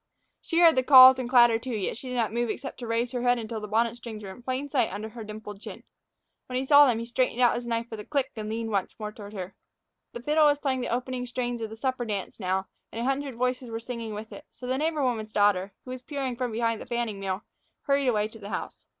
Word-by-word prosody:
She 330 Hz, -, -3 dB
heard 330 Hz, -2 st, +7 dB
the 260 Hz, -, +4 dB
calls 260 Hz, -1 st, +9 dB
and 245 Hz, -2 st, -3 dB
clatter, 240 Hz, -3 st, +6 dB
too; 250 Hz, 0 st, -4 dB
yet 200 Hz, -3 st, -2 dB
she 255 Hz, +3 st, -7 dB
did 250 Hz, -, -4 dB
not 225 Hz, -3 st, 0 dB
move 240 Hz, 0 st, 0 dB
except 270 Hz, -, -5 dB
to 240 Hz, -, -6 dB
raise 230 Hz, +1 st, 0 dB
her 245 Hz, -, -2 dB
head 245 Hz, 0 st, +3 dB
until 225 Hz, -1 st, -4 dB
the 210 Hz, -, -5 dB
bonnet 230 Hz, +2 st, +1 dB
strings 220 Hz, -3 st, -8 dB
were 195 Hz, -, -7 dB
in 190 Hz, -, -12 dB
plain 260 Hz, +3 st, -3 dB
sight 260 Hz, -5 st, +1 dB
under 215 Hz, +2 st, -5 dB
her 230 Hz, 0 st, -8 dB
dimpled 210 Hz, -1 st, -9 dB
chin. -, -, -9 dB, 0.6 s
When 250 Hz, -, -3 dB
he 260 Hz, -, -1 dB
saw 285 Hz, +1 st, +8 dB
them, 240 Hz, -3 st, +2 dB
he 230 Hz, -, -4 dB
straightened 245 Hz, 0 st, 0 dB
his 240 Hz, 0 st, -4 dB
knife 230 Hz, 0 st, -1 dB
out 235 Hz, -, -34 dB
with 220 Hz, -, -6 dB
a 210 Hz, -, -8 dB
click 275 Hz, -3 st, -1 dB
and 215 Hz, -1 st, -5 dB
leaned 225 Hz, 0 st, -3 dB
once 200 Hz, -2 st, -1 dB
more 210 Hz, -1 st, -5 dB
toward 205 Hz, -1 st, -11 dB
her. 190 Hz, -1 st, -6 dB, 0.6 s
The 240 Hz, -, -7 dB
fiddle 300 Hz, +3 st, +4 dB
was 290 Hz, 0 st, +3 dB
playing 265 Hz, -3 st, -1 dB
the 245 Hz, -, -2 dB
opening 250 Hz, +1 st, -2 dB
strains 245 Hz, -1 st, -3 dB
of 220 Hz, -, -3 dB
the 220 Hz, -, -9 dB
supper 255 Hz, 0 st, -1 dB
dance 205 Hz, -2 st, -4 dB
now, 190 Hz, 0 st, -1 dB, 0.3 s
and 225 Hz, -, -6 dB
a 235 Hz, -, -1 dB
hundred 270 Hz, -1 st, -1 dB
voices 250 Hz, 0 st, -1 dB
were 225 Hz, 0 st, -4 dB
singing 230 Hz, -2 st, -6 dB
with 215 Hz, +1 st, -7 dB
it; 295 Hz, -, -11 dB
so 250 Hz, -, -11 dB
the 260 Hz, +1 st, -1 dB
neighbor 310 Hz, -1 st, 0 dB
woman's 220 Hz, -4 st, -1 dB
daughter, 205 Hz, -2 st, +2 dB
who 255 Hz, -, -7 dB
had 255 Hz, -, -5 dB
been 255 Hz, -, -35 dB
peering 270 Hz, -4 st, -3 dB
from 250 Hz, -1 st, -2 dB
behind 230 Hz, 0 st, -1 dB
the -, -, -9 dB
fanning 235 Hz, -4 st, -2 dB
mill, 195 Hz, +1 st, -3 dB, 0.4 s
hurried 275 Hz, -1 st, +1 dB
away 215 Hz, -3 st, +2 dB
to 225 Hz, -, -13 dB
the 200 Hz, -, -8 dB
house. -, -, -6 dB
235 Hz, 270 wpm, -27 LUFS, 220-255 Hz, 0.6 s, calls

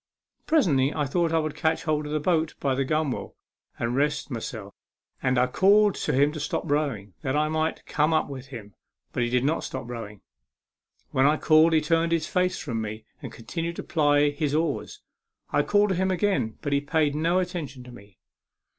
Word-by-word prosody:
Presently, 150 Hz, -, +3 dB
I 150 Hz, -2 st, -1 dB
thought 165 Hz, +4 st, 0 dB
I 165 Hz, -, +2 dB
would 155 Hz, -2 st, -1 dB
catch 160 Hz, -1 st, 0 dB
hold 150 Hz, -1 st, -1 dB
of -, -, -6 dB
the 155 Hz, -, 0 dB
boat 160 Hz, 0 st, 0 dB
by 135 Hz, -2 st, 0 dB
the 135 Hz, +1 st, 0 dB
gunwale 155 Hz, -1 st, -2 dB, 0.4 s
to 115 Hz, -, -1 dB
rest 140 Hz, +4 st, -1 dB
myself, 110 Hz, -3 st, -6 dB, 0.5 s
and 130 Hz, 0 st, +1 dB
I 125 Hz, -, +4 dB
called 200 Hz, +9 st, +4 dB
to -, -, -2 dB
him 145 Hz, +3 st, +3 dB
to 155 Hz, -, -6 dB
stop 150 Hz, -, -2 dB
rowing, 140 Hz, -, -1 dB
that 135 Hz, -2 st, -1 dB
I 155 Hz, +1 st, +2 dB
might 160 Hz, +1 st, -1 dB
corne 150 Hz, +2 st, +1 dB
up 155 Hz, -1 st, +2 dB
with 135 Hz, -2 st, -8 dB
him; 110 Hz, -6 st, -10 dB, 0.4 s
but -, -, -1 dB
he 120 Hz, -, +1 dB
did 125 Hz, +1 st, +1 dB
not 150 Hz, +4 st, 0 dB
stop 130 Hz, -3 st, -5 dB
rowing. 110 Hz, -4 st, -7 dB, 0.9 s
When 130 Hz, +1 st, +3 dB
I 150 Hz, +1 st, +3 dB
called 160 Hz, +1 st, +5 dB
he 160 Hz, -, +4 dB
turned 165 Hz, +2 st, +1 dB
his 165 Hz, -2 st, +1 dB
face 180 Hz, +2 st, 0 dB
from 115 Hz, -6 st, -3 dB
me, 110 Hz, 0 st, -6 dB, 0.2 s
and -, -, -7 dB
continued 165 Hz, +8 st, -5 dB
to -, -, -6 dB
ply 145 Hz, -3 st, +3 dB
his 145 Hz, 0 st, -1 dB
oars. 165 Hz, +2 st, -2 dB, 0.5 s
I -, -, +3 dB
called 205 Hz, 0 st, +2 dB
to 190 Hz, -, +1 dB
him 190 Hz, +2 st, +1 dB
again, 185 Hz, -, 0 dB
but 145 Hz, -2 st, -1 dB
he 140 Hz, -, +2 dB
paid 150 Hz, 0 st, +1 dB
no 165 Hz, +4 st, +1 dB
attention 170 Hz, -8 st, -3 dB
to 125 Hz, -, -12 dB
me. 100 Hz, -5 st, -15 dB
150 Hz, 205 wpm, -26 LUFS, 130-165 Hz, 0.9 s, called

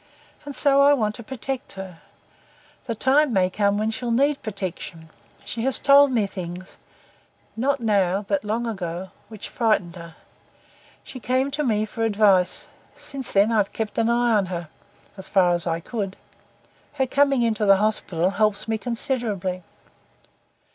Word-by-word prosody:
"and 285 Hz, -1 st, -7 dB
so 280 Hz, -1 st, +4 dB
I 285 Hz, +1 st, +6 dB
want 215 Hz, -5 st, -1 dB
to 235 Hz, -, -8 dB
protect 265 Hz, +2 st, -6 dB
her. 190 Hz, -3 st, -9 dB, 0.9 s
The 230 Hz, -, -2 dB
time 270 Hz, +5 st, +3 dB
may 185 Hz, -3 st, +2 dB
come 200 Hz, +1 st, +1 dB
when 215 Hz, +1 st, 0 dB
she'll 240 Hz, +2 st, -4 dB
need 275 Hz, +5 st, +2 dB
protection. 180 Hz, -5 st, -6 dB, 0.3 s
She 230 Hz, -, -4 dB
has 265 Hz, +2 st, +4 dB
told 280 Hz, 0 st, +6 dB
me 225 Hz, -5 st, +2 dB
things 185 Hz, -1 st, -8 dB, 0.8 s
not 270 Hz, +5 st, 0 dB
now 200 Hz, -3 st, +1 dB
but 195 Hz, 0 st, 0 dB
long 220 Hz, +3 st, -2 dB
ago 185 Hz, -4 st, -5 dB, 0.2 s
which 215 Hz, -2 st, -8 dB
frightened 215 Hz, -7 st, 0 dB
her. 170 Hz, -1 st, -11 dB, 0.9 s
She 265 Hz, -1 st, -9 dB
came 255 Hz, +3 st, 0 dB
to 300 Hz, +2 st, -2 dB
me 215 Hz, -5 st, +1 dB
for 225 Hz, +2 st, -7 dB
advice. 205 Hz, -4 st, +3 dB, 0.3 s
Since 270 Hz, -3 st, -6 dB
then 205 Hz, +3 st, +3 dB
I've 210 Hz, -3 st, +1 dB
kept 220 Hz, -1 st, -3 dB
an 230 Hz, 0 st, +2 dB
eye 240 Hz, 0 st, +2 dB
on 200 Hz, -3 st, +2 dB
her 170 Hz, -3 st, -5 dB, 0.5 s
as 190 Hz, -, -9 dB
far 180 Hz, -3 st, +4 dB
as 175 Hz, 0 st, -2 dB
I 165 Hz, 0 st, 0 dB
could. 195 Hz, +1 st, -4 dB, 0.8 s
Her 265 Hz, -, 0 dB
coming 275 Hz, -1 st, +2 dB
into 220 Hz, -2 st, 0 dB
the 195 Hz, 0 st, +7 dB
hospital 190 Hz, -4 st, 0 dB
helps 210 Hz, 0 st, 0 dB
me 220 Hz, -1 st, -1 dB
considerably." 225 Hz, -7 st, -2 dB
215 Hz, 160 wpm, -23 LUFS, 190-245 Hz, 0.9 s, the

